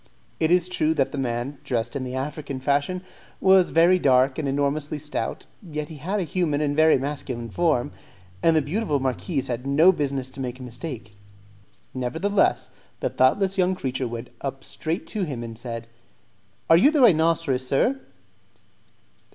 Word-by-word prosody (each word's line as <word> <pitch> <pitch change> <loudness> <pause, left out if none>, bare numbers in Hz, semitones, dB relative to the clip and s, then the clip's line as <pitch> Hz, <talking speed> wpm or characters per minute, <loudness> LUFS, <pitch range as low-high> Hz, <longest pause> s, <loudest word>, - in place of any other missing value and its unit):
It 160 - +2
is 180 0 +3
true 160 -3 0
that 135 -3 +1
the 145 - -4
man, 125 +2 -3
dressed 120 0 -2
in 135 - -2
the 130 0 -5
African 140 0 -4
fashion, 145 +7 0 0.4
was 190 -1 +5
very 175 +3 +4
dark 130 -2 +3
and 150 - -2
enormously 145 +2 -1
stout, 150 +1 -4 0.2
yet 150 -6 -5
he 160 - -9
had 190 +9 -2
a - - 0
human 165 -3 0
and 145 -1 0
very 155 0 +5
masculine 130 -4 -5
form, 150 -5 +1 0.5
and 165 - +4
the 155 - +3
beautiful 155 -1 -1
marquise 135 +3 -2
had 125 +2 -4
no 155 +7 +6
business 140 -6 -3
to 135 - -12
make 130 -1 -4
a - - -8
mistake. 120 -3 -7 0.8
Nevertheless, 160 +11 0 0.3
the - - -1
thoughtless 190 +9 +2
young 185 +1 +3
creature 130 -6 -3
went 115 +1 -7
up 135 -1 -5
straight 165 +4 -4
to 215 - -3
him 140 -10 -3
and 115 -1 -7
said, 115 0 -6 0.8
"Are 165 - +7
you 235 +12 +6
the 300 -2 +2
rhinoceros, 160 - +3
sir?" 240 - +2
145 Hz, 165 wpm, -24 LUFS, 130-165 Hz, 0.8 s, Are